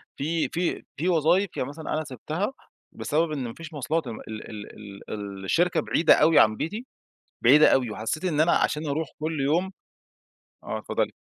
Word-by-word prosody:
في 160 +3 -1
في 175 +1 -2
في 175 +5 0
وظايف 175 +3 +2
يعني 125 - -2
مثلًا 155 +2 -5
أنا 155 - 0
سِبتها 155 - -4 0.4
بسبب 155 +2 0
إن 145 -4 -2
ما 115 - -7
فيش 165 -1 -10
مواصلات. 150 +2 -1
ال 115 -2 -6 0.9
ال 100 -2 -6
الشركة 175 - +2
بعيدة 165 - +4
أوي 160 +1 +5
عن 110 0 +5
بيتي، 210 - -4 0.6
بعيدة 145 +6 +7
أوي، 125 -3 +2
وحسيت 110 - -3
إن 160 -5 0
أنا 165 +2 +4
عشان 150 +1 +1
أروح 155 +2 -1
كل 155 -1 -2
يوم 170 +7 +1 0.9
آه، - - -3
اتفضلي. - - -2
155 Hz, 165 wpm, -26 LUFS, 135-165 Hz, 0.9 s, بعيدة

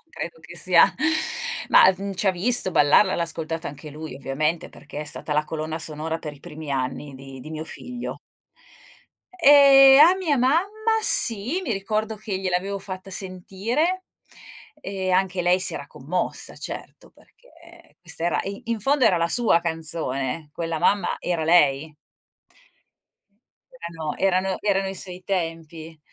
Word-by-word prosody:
credo - - -7
che - - -13
sia, - - +4 0.8
mah, 190 - +7
mhmm, 200 0 -5
ci 190 - -3
ha - - +6
visto 190 +3 +1
ballarla, 150 +5 +4
l'ha - - -1
ascoltata 165 0 -4
anche 145 +2 -10
lui, 155 +2 -8
ovviamente, 150 +5 -2
perché 145 0 -10
è - - -5
stata 150 0 -5
la 150 +1 +1
colonna 155 +1 -5
sonora 160 +1 -4
per 155 -2 -7
i 145 - -16
primi 150 -1 -9
anni 135 +1 -3
di 135 0 -11
di 155 - -10
mio 155 0 -5
figlio. 245 +8 -7 1.2
Ehm, 275 -2 +8
a 355 - +4
mia 335 -7 0
mamma 285 +9 +2 0.4
sì, 240 - +3
mi 280 -11 -2
ricordo 215 +2 -2
che 205 -2 -5
gliel'avevo 190 +1 -2
fatta 190 0 -8
sentire, 205 - -3 0.8
e 190 -5 -4
anche 185 0 +1
lei 180 +1 +3
si 180 -2 +2
era 140 - -6
commossa, 160 +9 -4
certo, - - -9
perché - - -21
questa 165 - -7
era 175 - +1
e 200 +1 -7
in 230 -1 -3
fondo 270 +4 +2
era 180 - +4
la 170 0 0
sua 220 -3 +3
canzone, 160 -3 -2
quella 165 0 -4
mamma 200 -3 +1
era 170 -3 -2
lei. 155 -2 +3 1.8
Erano 165 -8 -6
erano 190 0 +1
erano 195 -2 0
i 190 - -5
suoi 185 -1 -9
tempi. 165 -3 -5
180 Hz, 150 wpm, -23 LUFS, 155-200 Hz, 1.8 s, Ehm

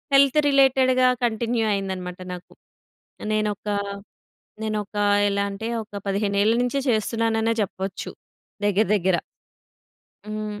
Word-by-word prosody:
Health 275 +1 +5
రిలేటెడ్‌గా 260 -2 +4 0.2
continue 230 0 0
అయిందన్నమాట 185 -2 -4
నాకు. 180 0 -10 0.8
నేనొక 210 -1 -1 1.0
నేనొక 210 -1 -3 0.3
ఎలా 200 0 0
అంటే, 220 +3 -5
ఒక 205 -1 -8
15 200 0 0
ఏళ్ల 220 +2 +4
నుంచే 250 +3 0
చేస్తున్నాననే 225 0 +1
చెప్పొచ్చు, 190 -1 -4 0.6
దగ్గర 205 +2 +3
దగ్గర. 190 -2 +2 1.1
హ్మ్. 215 -1 -5
215 Hz, 100 wpm, -24 LUFS, 200-230 Hz, 1.1 s, Health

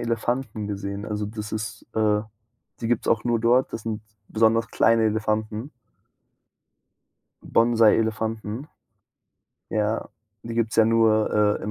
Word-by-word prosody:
Elefanten 115 -1 -2
gesehen. 100 0 -4
Also 105 -1 -3
das 105 0 -7
ist 110 0 -5
äh, 105 -1 +2 0.6
die 115 - -2
gibt's 120 -1 0
auch 110 - +2
nur 120 -1 +1
dort, 120 +3 +3
das 110 - -5
sind 110 -1 -4 0.3
besonders 115 +1 +2
kleine 115 -1 +3
Elefanten. 110 +3 -1 1.7
Bonsai-Elefanten. 110 +1 +1 1.1
Ja, 110 +1 -1 0.3
die 115 0 -6
gibt's 115 -1 0
ja 110 - +6
nur, 110 -2 +3
äh, - - -12
in 105 - -3
110 Hz, 125 wpm, -24 LUFS, 105-115 Hz, 1.7 s, ja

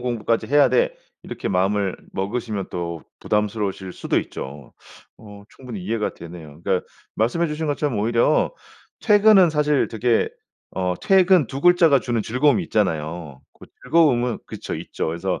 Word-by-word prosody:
공부까지 115 -2 -1
해야 145 -1 +5
돼.' 125 0 +1 0.3
이렇게 - - -5
마음을 95 +1 0 0.2
먹으시면 105 0 -3
또 85 -2 -5 0.2
부담스러우실 105 -3 -2
수도 - - -1
있죠. 70 -1 -7 0.5
어 105 -2 -13
충분히 120 -7 -9
이해가 110 +1 -2
되네요. 80 -3 -11
그러니까 95 -2 0 0.3
말씀해 145 +11 +1
주신 155 +1 -3
것처럼 145 -4 -1
오히려 115 +7 +2 0.5
퇴근은 205 -4 +6
사실 150 -2 +1
되게 115 +1 +1 0.5
어 90 -1 -1
퇴근 185 -5 +4
2 135 +3 -6
글자가 170 -5 +5
주는 120 -2 -1
즐거움이 145 - +2
있잖아요. 80 - -2 0.2
그 - - -13 0.2
즐거움은 125 -8 +2
그쵸 - - -6
있죠. - - -4
그래서 85 +3 -2
115 Hz, 345 characters per minute, -22 LUFS, 95-145 Hz, 0.5 s, 퇴근은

